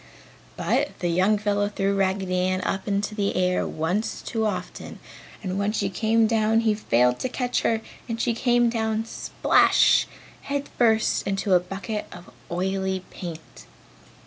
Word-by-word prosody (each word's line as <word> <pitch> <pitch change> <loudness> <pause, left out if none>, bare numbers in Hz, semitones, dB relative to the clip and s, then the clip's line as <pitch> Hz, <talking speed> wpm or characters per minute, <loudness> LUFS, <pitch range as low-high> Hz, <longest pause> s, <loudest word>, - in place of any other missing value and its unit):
But - - 0
the 175 - -1
young 190 +5 +3
fellow 205 0 0
threw 195 -1 0
Raggedy 190 -1 0
Ann 185 +1 0
up 190 +1 -3
into 200 +1 -1
the 200 -2 -1
air 180 0 +1
once 180 +8 -2
too 220 -1 -1
often 180 -3 -5 0.5
and 190 0 -2
when 200 +1 +1
she 200 -2 -1
came 225 +3 +2
down 220 0 +2
he 220 -2 +2
failed 125 - +2
to 255 - -2
catch 250 -1 -1
her 225 -1 +1 0.3
and 230 0 -3
she 235 0 +1
came 240 0 +2
down 220 -1 -1
splash, - - +3 0.3
head 280 0 -3
first 220 -2 +2
into 195 0 0
a 180 - +6
bucket 195 +4 -5
of 175 -7 -12 0.2
oily 190 +1 -1
paint. 160 - -9
200 Hz, 155 wpm, -24 LUFS, 185-220 Hz, 0.5 s, a